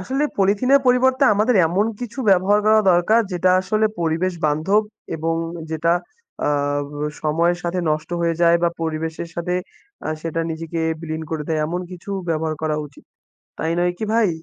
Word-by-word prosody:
আসলে 265 Hz, +10 st, -1 dB
পলিথিনের 230 Hz, +8 st, +4 dB
পরিবর্তে 260 Hz, +2 st, +3 dB
আমাদের 220 Hz, +4 st, +2 dB
এমন 195 Hz, +6 st, +1 dB
কিছু 245 Hz, +2 st, -7 dB
ব্যবহার 195 Hz, +3 st, +4 dB
করা 220 Hz, 0 st, +6 dB
দরকার 195 Hz, +7 st, +4 dB
যেটা 180 Hz, +1 st, +2 dB
আসলে 215 Hz, +3 st, +1 dB
পরিবেশ 165 Hz, +3 st, 0 dB
বান্ধব 160 Hz, +9 st, +2 dB, 0.3 s
এবং 165 Hz, +1 st, -1 dB, 0.4 s
যেটা 160 Hz, +2 st, +1 dB, 0.5 s
আ -, -, +2 dB, 0.4 s
ব -, -, -14 dB, 0.3 s
সময়ের 170 Hz, +3 st, +1 dB
সাথে 175 Hz, +1 st, -2 dB
নষ্ট 155 Hz, +2 st, -2 dB
হয়ে 170 Hz, -1 st, +1 dB
যায় 170 Hz, 0 st, +6 dB
বা 170 Hz, -, +4 dB
পরিবেশের 160 Hz, +1 st, -3 dB
সাথে 175 Hz, +1 st, -2 dB, 0.5 s
আ -, -, -2 dB
সেটা 165 Hz, 0 st, -2 dB
নিজেকে 165 Hz, +1 st, -4 dB, 0.2 s
বিলীন 160 Hz, -1 st, -4 dB
করে 155 Hz, -2 st, -2 dB
দেয়। 155 Hz, -1 st, 0 dB
এমন 175 Hz, +3 st, -3 dB
কিছু 180 Hz, +2 st, -9 dB, 0.2 s
ব্যবহার 160 Hz, -1 st, -1 dB
করা 155 Hz, -1 st, 0 dB
উচিত। 140 Hz, -, -18 dB, 0.5 s
তাই 160 Hz, +1 st, -1 dB
নয় 175 Hz, 0 st, +2 dB
কি 220 Hz, -, -2 dB
ভাই? 225 Hz, -3 st, +4 dB
170 Hz, 165 wpm, -21 LUFS, 160-205 Hz, 0.5 s, করা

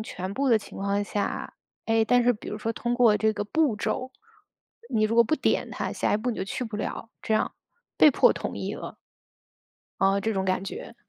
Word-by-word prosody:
全 190 Hz, -3 st, -5 dB
部 270 Hz, +5 st, 0 dB
的 230 Hz, -, +6 dB
情 210 Hz, -, -11 dB
况 200 Hz, +1 st, 0 dB
下， 205 Hz, 0 st, -3 dB, 0.3 s
诶， 225 Hz, 0 st, +3 dB
但 245 Hz, +2 st, +4 dB
是 245 Hz, -, +4 dB
比 210 Hz, -, -9 dB
如 -, -, -4 dB
说 225 Hz, +2 st, -2 dB
通 240 Hz, +2 st, -2 dB
过 235 Hz, -4 st, +5 dB
这 220 Hz, +1 st, +2 dB
个 210 Hz, -, -3 dB
步 290 Hz, +1 st, +1 dB
骤， 255 Hz, +5 st, -3 dB, 0.8 s
你 215 Hz, -2 st, +2 dB
如 220 Hz, +2 st, 0 dB
果 235 Hz, -, +7 dB
不 310 Hz, -, +1 dB
点 -, -, 0 dB
它， -, -, -3 dB
下 -, -, 0 dB
一 -, -, +4 dB
步 230 Hz, +4 st, -2 dB
你 230 Hz, -, -4 dB
就 -, -, -1 dB
去 200 Hz, -, -4 dB
不 220 Hz, -3 st, -5 dB
了， 220 Hz, +2 st, -5 dB
这 220 Hz, -, 0 dB
样， 215 Hz, -, +1 dB, 0.4 s
被 305 Hz, -, +7 dB
迫 -, -, +5 dB
同 -, -, -5 dB
意 -, -, -4 dB
了。 -, -, -8 dB, 1.1 s
哦， 195 Hz, +1 st, +3 dB
这 220 Hz, +1 st, -1 dB
种 190 Hz, -1 st, -1 dB
感 185 Hz, 0 st, 0 dB
觉。 195 Hz, +4 st, -7 dB
220 Hz, 240 characters per minute, -26 LUFS, 205-240 Hz, 1.1 s, 果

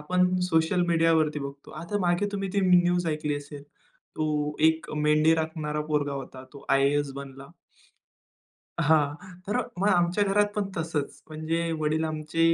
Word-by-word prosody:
आपण 180 Hz, +4 st, +1 dB
सोशल 160 Hz, +2 st, +2 dB
मीडियावरती 165 Hz, -3 st, +2 dB
बघतो. 140 Hz, 0 st, -8 dB
आता 170 Hz, +6 st, -4 dB
मागे 175 Hz, +3 st, +1 dB
तुम्ही 195 Hz, -1 st, -2 dB
ती 200 Hz, -, +1 dB
न्यूज 175 Hz, -1 st, +3 dB
ऐकली 150 Hz, -2 st, -1 dB
असेल. 145 Hz, 0 st, -9 dB, 0.5 s
तो 150 Hz, -1 st, -1 dB
एक 160 Hz, 0 st, -2 dB
मेंढी 150 Hz, +1 st, +3 dB
राखणारा 155 Hz, -2 st, -2 dB
पोरगा 145 Hz, -2 st, 0 dB
होता. 130 Hz, -1 st, -7 dB
तो 140 Hz, -, -12 dB
आय-ए-एस 140 Hz, +1 st, +2 dB
बनला. 135 Hz, 0 st, -9 dB, 1.3 s
हां, 145 Hz, -2 st, +3 dB, 0.3 s
तर 210 Hz, -, -1 dB, 0.2 s
मग 200 Hz, +2 st, +2 dB
आमच्या 175 Hz, +1 st, +2 dB
घरात 205 Hz, +1 st, +3 dB
पण 210 Hz, -, 0 dB
तसंच. 160 Hz, -3 st, -3 dB
म्हणजे 165 Hz, +2 st, -2 dB
वडील 155 Hz, +1 st, 0 dB
आमचे 155 Hz, +1 st, -3 dB
155 Hz, 145 wpm, -26 LUFS, 150-175 Hz, 1.3 s, न्यूज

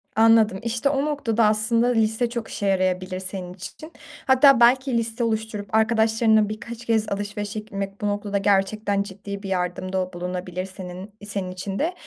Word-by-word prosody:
Anladım. 220 Hz, -3 st, +5 dB
İşte, 235 Hz, +4 st, 0 dB
o 275 Hz, +1 st, 0 dB
noktada 235 Hz, -7 st, 0 dB
aslında 220 Hz, +3 st, +2 dB
liste 225 Hz, 0 st, +1 dB
çok 235 Hz, -2 st, -4 dB
işe 205 Hz, -, -4 dB
yarayabilir 185 Hz, -1 st, 0 dB
senin 185 Hz, -1 st, -6 dB
için. 310 Hz, -, -10 dB, 0.4 s
Hatta 265 Hz, -1 st, +6 dB
belki 255 Hz, +1 st, +4 dB
liste 230 Hz, +1 st, -2 dB
oluşturup 220 Hz, -2 st, -2 dB
arkadaşlarınla 220 Hz, -1 st, +3 dB
birkaç 235 Hz, +2 st, -7 dB
kez 220 Hz, -2 st, +1 dB
alışverişe 205 Hz, +1 st, -3 dB
gitmek 195 Hz, -1 st, -6 dB
bu 205 Hz, -, 0 dB
noktada 205 Hz, 0 st, -1 dB
gerçekten 200 Hz, +1 st, +1 dB
ciddi 200 Hz, 0 st, -8 dB
bir 195 Hz, -, -5 dB
yardımda 185 Hz, 0 st, -2 dB
bulunabilir 180 Hz, +1 st, -4 dB
senin 185 Hz, +1 st, -9 dB
senin 195 Hz, -3 st, -4 dB
için 190 Hz, +2 st, -5 dB
de. 335 Hz, +4 st, 0 dB
210 Hz, 155 wpm, -23 LUFS, 190-230 Hz, 0.4 s, Hatta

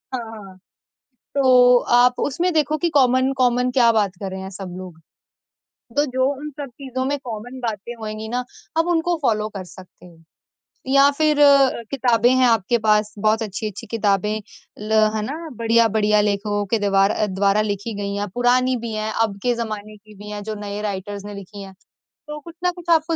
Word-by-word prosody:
हाँ, 245 Hz, -, -3 dB
हाँ। 195 Hz, -4 st, -11 dB, 0.8 s
तो 250 Hz, -2 st, +6 dB, 0.3 s
आप 250 Hz, 0 st, +3 dB
उसमें 340 Hz, +6 st, 0 dB
देखो 310 Hz, -1 st, +1 dB
कि 340 Hz, -, 0 dB
कॉमन 260 Hz, -1 st, +3 dB
कॉमन 250 Hz, 0 st, +2 dB
क्या 245 Hz, -2 st, +4 dB
बात 205 Hz, -4 st, 0 dB
कर 195 Hz, -2 st, -4 dB
रहे 190 Hz, 0 st, -6 dB
हैं 190 Hz, -, -7 dB
सब 185 Hz, -2 st, -8 dB
लोग? 180 Hz, -3 st, -10 dB, 1.0 s
तो 290 Hz, +1 st, +3 dB
जो 260 Hz, -1 st, 0 dB
उन 300 Hz, +1 st, -6 dB
सब 280 Hz, -, -5 dB
चीज़ों 260 Hz, 0 st, -5 dB
में 285 Hz, +1 st, -1 dB
कॉमन 245 Hz, +2 st, -7 dB
बातें 230 Hz, -1 st, -4 dB
होएगी 215 Hz, 0 st, -6 dB
ना 250 Hz, +2 st, -2 dB, 0.3 s
आप 330 Hz, -, +3 dB
उनको 345 Hz, 0 st, +1 dB
फॉलो 215 Hz, -5 st, +1 dB
कर 195 Hz, -2 st, -7 dB
सकते 185 Hz, 0 st, -15 dB
हो 170 Hz, -2 st, -17 dB, 0.7 s
या 275 Hz, +1 st, +5 dB
फिर 305 Hz, -1 st, +2 dB, 0.5 s
किताबें 245 Hz, -3 st, +3 dB
हैं 260 Hz, 0 st, +4 dB
आपके 230 Hz, 0 st, +2 dB
पास 210 Hz, 0 st, +2 dB
बहुत 215 Hz, +2 st, +2 dB
अच्छी-अच्छी 210 Hz, -1 st, -6 dB
किताबें 210 Hz, -1 st, 0 dB, 0.5 s
ल -, -, -5 dB, 0.2 s
है 215 Hz, -, -1 dB
ना, 315 Hz, +6 st, -6 dB
बढ़िया-बढ़िया 220 Hz, -2 st, +3 dB
लेखकों 205 Hz, 0 st, -1 dB
के 225 Hz, -, +3 dB
द्वार 195 Hz, 0 st, +3 dB
अ, 215 Hz, -, 0 dB
द्वारा 200 Hz, +2 st, +1 dB
लिखी 210 Hz, +1 st, -3 dB
गई 200 Hz, 0 st, -3 dB
हैं। 205 Hz, 0 st, -2 dB
पुरानी 250 Hz, +1 st, +2 dB
भी 230 Hz, -1 st, -5 dB
हैं, 215 Hz, 0 st, -2 dB
अब 205 Hz, -3 st, 0 dB
के 245 Hz, -, +2 dB
ज़माने 215 Hz, -2 st, -5 dB
की 210 Hz, 0 st, -18 dB
भी 210 Hz, +1 st, -10 dB
हैं, 205 Hz, -, -5 dB
जो 215 Hz, 0 st, -5 dB
नए 205 Hz, +1 st, -5 dB
राइटर्स 200 Hz, 0 st, -5 dB
ने 205 Hz, -, -7 dB
लिखी 200 Hz, +1 st, -10 dB
हैं। 195 Hz, 0 st, -11 dB, 0.5 s
तो 300 Hz, 0 st, -6 dB
कुछ 335 Hz, +3 st, -13 dB
ना 360 Hz, -, +2 dB
कुछ 345 Hz, -1 st, -10 dB
आपको 320 Hz, +1 st, 0 dB
220 Hz, 190 wpm, -21 LUFS, 205-255 Hz, 1.0 s, तो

